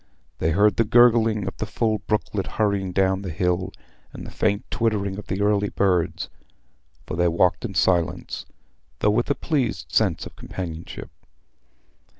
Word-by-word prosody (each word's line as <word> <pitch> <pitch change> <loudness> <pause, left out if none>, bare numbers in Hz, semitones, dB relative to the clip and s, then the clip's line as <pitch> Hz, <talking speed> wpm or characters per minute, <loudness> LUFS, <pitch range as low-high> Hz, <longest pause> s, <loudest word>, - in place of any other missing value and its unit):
They 80 - +1
heard 100 +4 +3
the 115 - +4
gurgling 115 -3 +4
of 95 - -4
the 110 - -3
full 110 0 0
brooklet 105 -1 -2
hurrying 100 -4 +1
down 95 +1 +1
the 95 - -5
hill, 90 +2 -1 0.4
and - - -9
the - - -8
faint 100 -1 0
twittering 105 -4 0
of 105 - -10
the 95 +2 -2
early 105 -1 +2
birds. 90 -4 0 0.8
For - - -5
they 90 +1 +2
walked 85 +1 +2
in - - -5
silence, 85 -3 0 0.5
though 105 - +2
with 120 +5 0
a 140 - +2
pleased 135 -8 -2
sense 100 -7 +1
of - - -11
companionship. 85 -3 -7
100 Hz, 160 wpm, -24 LUFS, 90-110 Hz, 0.8 s, the